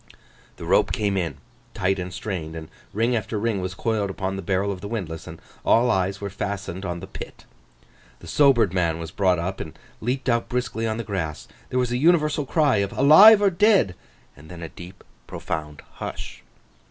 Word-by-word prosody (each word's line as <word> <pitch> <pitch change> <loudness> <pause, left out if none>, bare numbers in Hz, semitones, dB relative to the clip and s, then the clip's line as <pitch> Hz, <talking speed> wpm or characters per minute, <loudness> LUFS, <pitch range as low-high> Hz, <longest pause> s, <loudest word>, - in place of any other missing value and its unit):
The - - -8
rope - - +3
came 100 -2 0
in 85 -7 -2 0.4
tight 95 +1 0
and 90 0 -5
strained; 85 -5 -5
and 80 -1 -8 0.2
ring 115 +4 +1
after 110 0 -2
ring 105 -2 -1
was 95 +1 -4
coiled 110 -2 -1
upon 95 0 -3
the 95 - -4
barrel 95 +2 0
of 95 -2 -6
the 100 - -6
windlass, 90 -8 -5
and 80 +1 -9 0.2
all 120 +2 +4
eyes 95 0 0
were 100 -1 -5
fastened 100 -2 -4
on 85 -2 -4
the - - -6
pit. - - -10 0.7
The - - -13
sobered 130 - +4
man 85 -3 +1
was 80 -1 -7
brought 95 -2 +2
up 90 +3 -3
and 80 - -7 0.2
leaped 130 +4 -2
out 115 -2 +1
briskly 120 -2 -2
on 110 0 -2
the 115 - -3
grass. 90 -8 -4 0.2
There 130 - -2
was 125 -1 +1
an 120 - 0
universal 150 -2 +3
cry 145 -7 +3
of 100 -1 0
'Alive 200 +10 +8
or 200 - +4
dead?' 190 - +3 0.4
and 75 +3 -15
then 85 -1 -9
a 80 - -6
deep, 90 +3 -12 0.2
profound 75 -1 -5
hush. 60 -1 -7
100 Hz, 195 wpm, -24 LUFS, 90-120 Hz, 0.7 s, Alive